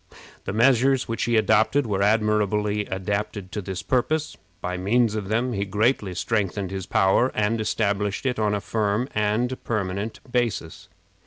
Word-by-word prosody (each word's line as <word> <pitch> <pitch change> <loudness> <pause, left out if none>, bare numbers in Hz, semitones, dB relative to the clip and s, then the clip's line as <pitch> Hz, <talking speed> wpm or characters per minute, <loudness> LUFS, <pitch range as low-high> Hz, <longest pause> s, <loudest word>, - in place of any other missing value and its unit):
The - - -2
measures 130 +4 +3
which 115 - -2
he 120 -1 +2
adopted 110 +6 +3
were 100 -3 -1
admirably 105 -1 +1
adapted 100 0 -3
to 105 - -3
this 95 -1 -5
purpose. 150 +4 0 0.2
By 90 - -3
means 105 +5 +2
of 105 -3 -3
them 120 +4 0
he 100 -2 -1
greatly 105 -1 0
strengthened 100 -2 -1
his 95 -1 -5
power, 95 +8 +3
and 110 +1 +1
established 105 0 -1
it 125 -3 0
on 105 -1 +1
a 100 - -2
firm 110 +3 0
and 110 +5 0
permanent 100 0 -3
basis. 120 -10 -2
105 Hz, 155 wpm, -24 LUFS, 100-115 Hz, 0.2 s, measures